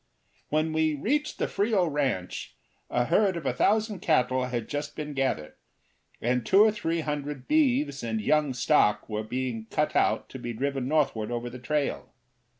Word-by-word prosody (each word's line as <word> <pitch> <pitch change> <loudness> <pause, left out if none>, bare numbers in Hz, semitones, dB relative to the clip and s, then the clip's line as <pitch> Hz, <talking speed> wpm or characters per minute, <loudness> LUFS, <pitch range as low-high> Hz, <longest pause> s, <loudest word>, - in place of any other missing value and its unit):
When 155 +1 +1
we 155 -1 +2
reached 290 - -1
the - - 0
Frio 205 -3 +1
ranch 135 - -2 0.3
a 120 0 +1
herd 195 - +2
of 160 - -6
a 130 - +1
thousand 210 - +1
cattle 130 -6 +2
had 120 -3 -3
just 145 0 -4
been 150 -1 -5
gathered, 135 - -1 0.7
and 125 +1 0
two 195 - +6
or 220 - +5
three 170 -6 -2
hundred 145 -3 -4
beeves 280 - +2
and 110 -1 -2
young 145 +4 +1
stock 120 -4 +3
were 105 -1 -2
being 115 0 -4
cut - - 0
out - - +2
to - - -8
be 120 - -4
driven 135 +2 -2
northward 135 -7 +1
over 120 0 -3
the 125 - -8
trail. 150 +2 -2
145 Hz, 170 wpm, -27 LUFS, 125-165 Hz, 0.7 s, two